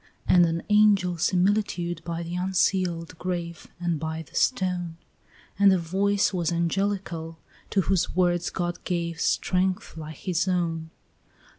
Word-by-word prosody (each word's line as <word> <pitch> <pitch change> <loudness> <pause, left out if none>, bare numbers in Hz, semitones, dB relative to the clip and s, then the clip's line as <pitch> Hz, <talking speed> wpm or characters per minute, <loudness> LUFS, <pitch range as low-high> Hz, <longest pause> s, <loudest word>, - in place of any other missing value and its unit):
And 175 -1 +6
an 165 +1 -2
angel's 205 -5 +4
similitude 180 -3 +1
by 170 0 -4
the 170 +1 -6
unsealed 180 -2 0
grave, 170 -2 -4
And 170 -3 -1
by 160 +1 -4
the - - -22
stone: 180 -7 0 0.6
And 200 -1 +7
the 190 - +4
voice 195 +4 +1
was 175 -2 0
angelical, 170 -1 -2 0.3
to 195 - +2
whose 190 -2 0
words 175 -1 +2
God 175 -1 -3
gave 170 -2 -2
Strength 185 0 0
like 155 0 -7
his 180 0 -1
own. 165 -3 -1
175 Hz, 135 wpm, -26 LUFS, 170-190 Hz, 0.6 s, And